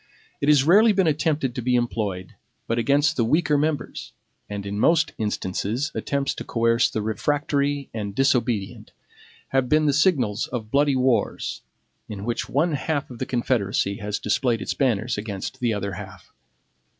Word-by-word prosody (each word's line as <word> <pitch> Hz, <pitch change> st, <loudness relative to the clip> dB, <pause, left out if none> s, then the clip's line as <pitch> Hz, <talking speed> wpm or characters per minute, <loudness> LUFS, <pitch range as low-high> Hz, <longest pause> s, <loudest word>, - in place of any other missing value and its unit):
It 145 Hz, -, +2 dB
has 145 Hz, -3 st, +6 dB
rarely 210 Hz, +8 st, +6 dB
been 190 Hz, -2 st, +2 dB
attempted 150 Hz, -4 st, 0 dB
to 125 Hz, -, -4 dB
be 125 Hz, +1 st, +1 dB
employed, 105 Hz, -6 st, -2 dB, 0.3 s
but 115 Hz, +1 st, -1 dB
against 145 Hz, +5 st, +2 dB
the 120 Hz, -, +3 dB
weaker 150 Hz, +5 st, +2 dB
members; 150 Hz, 0 st, -2 dB, 0.4 s
and 100 Hz, -1 st, -5 dB
in 100 Hz, +1 st, -3 dB
most 165 Hz, +7 st, +3 dB
instances 110 Hz, -, -2 dB
attempts 140 Hz, -1 st, -1 dB
to -, -, -7 dB
coerce 115 Hz, +1 st, +2 dB
the 110 Hz, -, -3 dB
refractory 140 Hz, +5 st, -1 dB
and 100 Hz, -3 st, -4 dB
disobedient 125 Hz, -6 st, 0 dB, 0.6 s
have 130 Hz, -2 st, +1 dB
been 155 Hz, 0 st, +3 dB
the 145 Hz, -, +3 dB
signals 135 Hz, -, +2 dB
of 110 Hz, -3 st, -5 dB
bloody 140 Hz, 0 st, +3 dB
wars, 125 Hz, -4 st, 0 dB, 0.5 s
in 105 Hz, -1 st, -6 dB
which 120 Hz, 0 st, -2 dB
one 160 Hz, +6 st, +1 dB
half 145 Hz, -1 st, -2 dB
of 120 Hz, -, -10 dB
the 130 Hz, -, -3 dB
confederacy 105 Hz, -5 st, 0 dB
has 105 Hz, -1 st, -3 dB
displayed 115 Hz, +2 st, 0 dB
its -, -, -3 dB
banners 120 Hz, -4 st, 0 dB
against 105 Hz, +4 st, -5 dB
the 120 Hz, -2 st, +1 dB
other 100 Hz, -2 st, -2 dB
half. 95 Hz, +1 st, -10 dB
125 Hz, 160 wpm, -24 LUFS, 105-145 Hz, 0.6 s, has